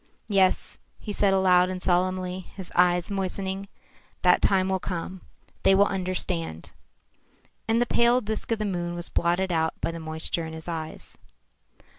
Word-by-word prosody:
"Yes," 195 -2 +2 0.2
he 210 - -6
said 200 -1 +3
aloud 185 -1 +4
and 185 0 -4
solemnly, 185 0 0 0.2
his 190 -3 -9
eyes 180 +1 +3
moistening, 195 0 -3 0.6
"that 180 -1 +5
time 190 -1 +3
will 190 0 0
come. 180 0 -5 0.4
They 195 - +5
will 200 +1 +5
understand." 180 - -3 1.0
And 225 +1 +2
the 240 - +3
pale 240 +1 +3
disk 220 -1 -4
of 225 - +2
the 215 - -2
moon 175 -3 -2
was 175 0 -6
blotted 175 +2 +1
out 160 -1 0
by - - -1
the 165 - -7
moisture 160 +1 -2
in 160 - -8
his 160 +1 -8
eyes. 160 -2 -6
185 Hz, 160 wpm, -26 LUFS, 175-195 Hz, 1.0 s, that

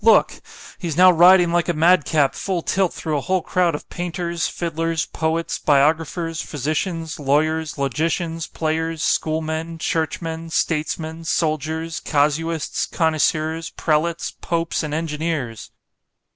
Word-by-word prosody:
—look—he's 170 -5 +1
now 185 0 +8
riding 175 0 +6
like 175 +1 +1
a - - +2
mad 165 0 +4
cap 145 -4 +2
full 185 -4 -2
tilt 190 -2 +1
through 155 -2 -3
a 145 - 0
whole 185 +3 0
crowd 180 -3 +1
of - - -8
painters, 175 -1 -3
fiddlers, 165 -1 -2
poets, 160 +1 -2
biographers, 160 +3 +1
physicians, 155 +3 -3
lawyers, 155 +2 +1
logicians, 160 +4 -1
players, 160 0 -2
school 155 +2 +1
men, 160 +1 -4
churchmen, 160 0 -2
statesmen, 160 0 -2
soldiers, 160 0 -1
casuists, 155 +2 0
connoisseurs, 160 0 0
prelates, 165 +2 0
popes, 170 -1 -2
and 155 -2 -3
engineers. 155 -7 -3
160 Hz, 120 wpm, -21 LUFS, 155-170 Hz, -, now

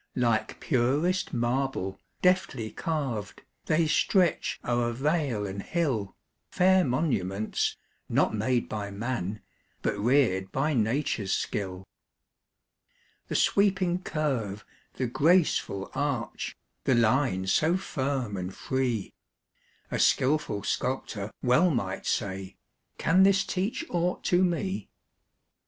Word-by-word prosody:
Like 120 -3 0
purest 145 +8 +1
marble, 120 -5 -1 0.2
deftly 180 -11 +2
carv'd, 135 -11 -3 0.2
They 160 +1 +3
stretch 175 +2 +2
o'er 120 -1 +1
vale 135 -5 0
and 100 0 -4
hill, 130 - -1 0.3
Fair 185 0 +4
monuments, 110 - 0 0.3
not - - +2
made 120 +3 0
by 105 -2 -4
man, 105 -1 -3 0.4
But 105 - -1
rear'd 105 -6 +2
by 150 +4 0
nature's 110 -4 0
skill. 95 -2 -3 1.4
The - - -4
sweeping 185 -3 +2
curve, 125 - -2 0.3
the 130 - -1
graceful 150 - +2
arch, 140 -5 -2 0.3
The 130 - +4
line 115 -4 +2
so 160 - +3
firm 135 - -2
and 90 0 -4
free; 125 -1 -2 0.8
A - - -1
skilful 130 -7 +2
sculptor 110 -6 -2
well 125 +8 +4
might 100 - -2
say: 95 -1 -2 0.4
"Can 185 +4 +3
this 195 0 +5
teach 195 - -2
aught 175 +1 0
to 180 +1 +3
me?" 185 +2 -1
130 Hz, 110 wpm, -28 LUFS, 105-160 Hz, 1.4 s, this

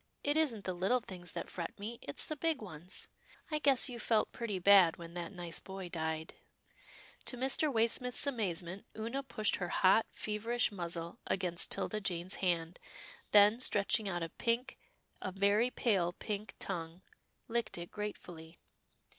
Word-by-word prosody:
It 290 +1 +1
isn't 270 -10 +1
the 185 - -1
little 190 +8 +2
things 180 -5 -8
that - - -4
fret 170 -2 -5
me, 225 +4 -6
it's 140 - -1
the 310 - -3
big 320 -1 0
ones 180 -4 -7 0.2
— - - -25
I 305 - +1
guess 275 -3 +4
you 245 -3 -6
felt 220 -1 +2
pretty 225 -5 -3
bad 185 -2 +7
when 170 0 -9
that 175 0 -5
nice 175 -4 -4
boy 190 -2 -7
died." 160 -1 -3 0.9
To 250 - -4
Mr. 270 +4 +2
Waysmith's 240 +3 +2
amazement, 190 -8 -2
Oonah 230 +5 -2
pushed 215 -6 0
her 180 - -2
hot, 190 +6 +4
feverish 225 +3 -1
muzzle 170 -3 -4
against 180 -3 +1
'Tilda 215 - 0
Jane's 180 -1 0
hand, 170 -2 0 0.5
then, 210 +2 +7
stretching 205 -3 +2
out 175 -2 -2
a 165 - -3
pink, 240 +8 -1 0.4
a 185 - -3
very 200 +5 +3
pale 190 -9 +1
pink 210 +2 -5
tongue, 170 -1 -5 0.4
licked 230 -4 -1
it 170 0 -7
gratefully. 175 -6 -7
200 Hz, 160 wpm, -34 LUFS, 175-235 Hz, 0.9 s, bad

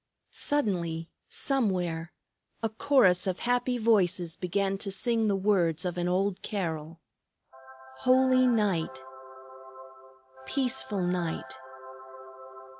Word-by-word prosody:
Suddenly, 170 - -1 0.2
somewhere, 180 - -1 0.5
a 225 - +1
chorus 215 -6 +3
of 185 -1 -2
happy 245 +1 0
voices 185 -7 +2
began 195 +2 -1
to 200 - -3
sing 225 +3 +1
the 200 - +2
words 185 -5 +1
of 180 -1 -2
an 175 0 -1
old 190 +1 0
carol: 165 -5 -4 1.0
"Holy 255 0 +4
night! 185 - 0 1.4
Peaceful 250 - 0
night! 175 -2 -2
195 Hz, 95 wpm, -28 LUFS, 175-230 Hz, 1.4 s, Holy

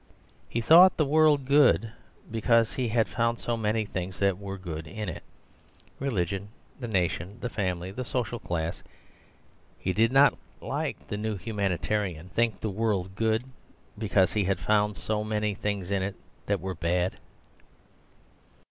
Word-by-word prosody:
He 120 - -1
thought 175 +9 +7
the 155 - +3
world 150 -1 +4
good 135 -5 +4 0.4
because 115 0 +3
he 130 -2 -1
had 115 0 +2
found 115 -1 0
so 120 - -2
many 110 0 0
things 95 -1 -4
that 100 -1 +1
were 100 -1 -6
good 80 -4 -6
in 105 +7 -5
it - - -6 0.8
religion, 100 -7 -1 0.3
the 120 - -4
nation, 95 0 -1
the 125 - -4
family, 95 -3 -2
the 125 +6 -4
social 120 -1 -2
class. 85 -3 -3 1.0
He 95 - -2
did 115 +3 +3
not, 135 +2 +6 0.2
like - - -4
the 105 - -2
new 110 0 -2
humanitarian, 95 -2 -2
think 115 0 0
the 110 - -2
world 95 -3 -1
good 110 +1 +1 0.5
because 100 -3 +2
he 105 -3 +1
had 95 0 +1
found 105 +3 +1
so 105 -1 -1
many 105 -1 -1
things 100 -2 -3
in 100 -1 +1
it 95 +1 -3 0.3
that 100 -4 0
were 95 0 -3
bad. 90 +1 0
105 Hz, 155 wpm, -28 LUFS, 95-115 Hz, 1.0 s, thought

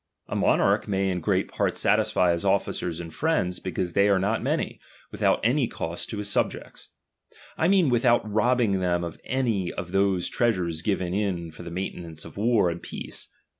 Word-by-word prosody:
A - - -4
monarch - - +2
may 95 -1 0
in 90 - -1
great 80 - +1
part - - -1
satisfy 90 -1 +3
his 85 0 -1
officers 85 -2 0
and 85 -2 -7
friends, 115 - 0
because 90 -1 -3
they 100 +2 +4
are 100 - +4
not 100 +4 0
many, - - -1 0.3
without - - +2
any 125 +3 +2
cost 85 -3 -5
to 110 - -4
his 105 0 -3
subjects; 100 - -2 0.7
I 160 - +1
mean 190 -3 +4
without 120 -1 +3
robbing 110 -1 +2
them 90 -1 0
of 85 -2 -7
any 115 -9 0
of 90 - -6
those 95 -2 +2
trea 120 -1 +2
sures 85 -4 -3
given 95 -4 -1
in 95 -5 -1
for - - -12
the 85 - -7
maintenance 85 -3 -5
of - - -11
war 105 -4 +2
and 85 - -6
peace. - - -6
95 Hz, 185 wpm, -26 LUFS, 85-115 Hz, 0.7 s, they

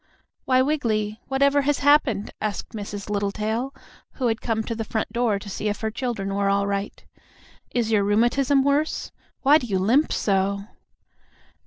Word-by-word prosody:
"Why, 255 0 +4
Wiggily, 220 -7 -1
whatever 280 +1 +3
has 290 +1 +1
happened?" 275 -8 +3
asked 210 -2 -3
Mrs. 205 -2 -6
Littletail, 210 +5 -2 0.4
who 250 -3 0
had 225 - -2
come 220 -2 -1
to 230 - -3
the 225 0 -3
front 220 0 -3
door 235 -4 +1
to 200 - -10
see 210 +2 -3
if 205 - -4
her 220 -1 -1
children 220 -5 -3
were 200 0 +1
all 200 0 +2
right. 200 0 -3 0.6
"Is 235 -2 -1
your 210 -2 +3
rheumatism 240 +6 +3
worse? 285 +3 0 0.3
Why 290 +3 +6
do 245 - -6
you 195 -4 0
limp 235 +11 +3
so?" 200 0 0
220 Hz, 165 wpm, -24 LUFS, 205-265 Hz, 0.6 s, Why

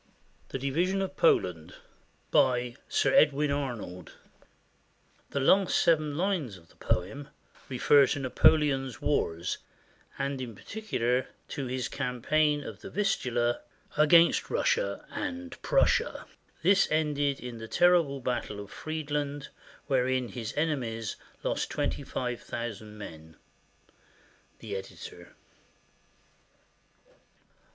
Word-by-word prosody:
THE - - -3
DIVISION 170 +9 0
OF 190 0 -5
POLAND 90 - +2 0.6
BY 125 -1 +3
SIR - - +2
EDWIN 150 -1 +4
ARNOLD 120 - -4 1.2
[The 140 - -2
last 190 +7 +4
seven 155 -3 +2
lines 170 - -1
of 85 -2 -20
the - - -22
poem 105 +11 -2 0.4
refer 135 +2 +5
to - - -1
Napoleon's 135 -1 +3
wars, 90 - -1 0.6
and 135 -1 -2
in 120 -4 -6
particular 130 - -1 0.2
to 135 -2 -4
his 125 0 -2
campaign 145 +3 +1
of - - -8
the - - -8
Vistula, 120 - 0 0.3
against 165 +3 +5
Russia - - 0
and 265 +1 -5
Prussia. 485 -1 +2 0.4
This 195 +3 +5
ended 145 -3 +1
in 120 -2 -7
the 115 - -7
terrible 170 -3 +3
battle 120 -4 -2
of 100 0 -9
Friedland, 145 -2 -3 0.4
wherein 130 -2 +1
his 115 -3 -5
enemies 120 -9 -1 0.3
lost - - -1
twenty - - -1
five 125 -2 -3
thousand 110 -2 -6
men. 80 -5 -10 1.2
The 105 -3 -6
Editor. 95 0 -9
135 Hz, 110 wpm, -29 LUFS, 120-155 Hz, 1.2 s, refer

